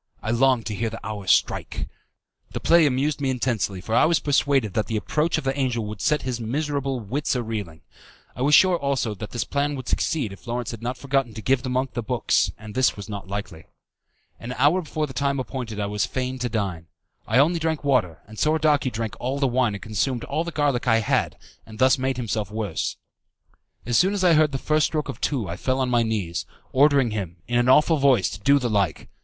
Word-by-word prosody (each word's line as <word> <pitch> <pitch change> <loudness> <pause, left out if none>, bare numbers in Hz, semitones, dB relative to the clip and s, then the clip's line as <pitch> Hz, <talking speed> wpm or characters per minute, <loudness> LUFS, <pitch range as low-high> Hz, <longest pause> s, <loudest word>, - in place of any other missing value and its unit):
I 110 - -1
longed 125 -1 +3
to 110 - -3
hear 115 +3 -2
the 115 - -9
hour 105 -3 -6
strike. - - +1 0.7
The - - -3
play 170 -2 +5
amused 145 +3 0
me 135 - 0
intensely, 115 -7 -1
for 110 - -5
I - - +5
was 165 +1 +3
persuaded 140 -7 +1
that 105 -1 0
the 110 - -1
approach 155 +10 0
of 160 - -3
the 135 0 -1
angel 125 -5 -1
would 105 -1 -7
set 150 - +1
his 125 -2 -3
miserable 140 +2 -2
wits 130 +7 -2
a 125 - -1
reeling. 105 -8 -5 0.5
I 125 - -6
was 145 +3 +5
sure, 185 -2 +5
also, 135 -6 -1
that 105 +1 -7
the 120 -1 -3
plan 145 +1 -1
would 130 -2 -7
succeed 140 - -1
if 100 - -15
Lawrence 120 0 -3
had 115 -2 -8
not 125 +2 -3
forgotten 135 -3 -1
to 110 - -6
give 130 -1 +2
the 130 - -4
monk 130 +1 -1
the 120 - -2
books, 120 -2 +1
and 110 0 -10
this 130 -2 +2
was 100 +1 -8
not 100 -2 -6
likely. 95 -5 -6 0.7
An 120 +2 -6
hour 150 +8 +4
before 155 -1 -2
the 135 - -9
time 140 +1 0
appointed 125 -5 -5
I 100 - 0
was 105 0 -1
fain 130 0 -3
to 125 0 -1
dine. 95 -7 -3 0.4
I 110 - +2
only 165 +5 +4
drank 160 -2 -1
water, 110 - +1
and 110 0 -11
Soradaci 150 -3 +2
drank 110 -1 -4
all 130 +3 -2
the 140 - +1
wine 120 -4 +1
and 100 - -8
consumed 115 +3 -1
all 160 - -2
the 170 - -5
garlic 145 -6 0
I 115 -1 +4
had, 105 - 0 0.3
and 110 -1 -12
thus 130 +3 +4
made 130 0 -1
himself 110 -4 -2
worse. 105 -5 -3 0.9
As 120 -1 +2
soon 190 +3 +3
as 195 - -1
I 175 -2 +5
heard 155 -1 +4
the 135 - -2
first 155 +3 +2
stroke 155 -2 -3
of - - -7
two 125 -9 -1
I 85 - -5
fell 130 0 -1
on 130 -1 0
my 120 -1 +3
knees, 90 -8 -2 0.2
ordering 140 -3 +4
him, 95 -5 -4
in 120 0 +1
an 120 +1 +2
awful 150 +4 +5
voice, 135 -9 +3
to 95 - -7
do 140 +7 +4
the 125 -3 -1
like. 100 -8 0
125 Hz, 230 wpm, -24 LUFS, 110-140 Hz, 0.9 s, play